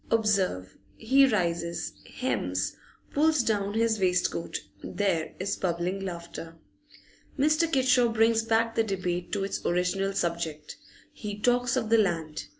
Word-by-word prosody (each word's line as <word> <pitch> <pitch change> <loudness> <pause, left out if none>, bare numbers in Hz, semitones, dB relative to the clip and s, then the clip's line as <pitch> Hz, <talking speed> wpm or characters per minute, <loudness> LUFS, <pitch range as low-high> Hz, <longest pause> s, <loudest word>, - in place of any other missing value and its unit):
Observe, 195 - +1 0.2
he 270 +4 +5
rises, 170 -6 -1 0.2
hems, - - -1 0.4
pulls 305 -2 +3
down 205 -2 0
his 225 -1 +2
waistcoat; 180 -2 0 0.2
there 185 -6 -1
is 190 +2 -1
bubbling 180 +1 -2
laughter. 170 -2 -7 0.8
Mr. 310 +4 +2
Kitshaw 255 -3 +3
brings 225 0 +3
back 225 0 +1
the 225 - +2
debate 180 -4 -3
to 200 -2 -1
its 195 - -3
original 180 +3 0
subject; 165 -4 -3 0.4
he 205 -1 -6
talks 245 +3 +2
of 225 -4 -1
the 230 - +6
Land. 165 -6 -1
200 Hz, 130 wpm, -28 LUFS, 175-230 Hz, 0.8 s, the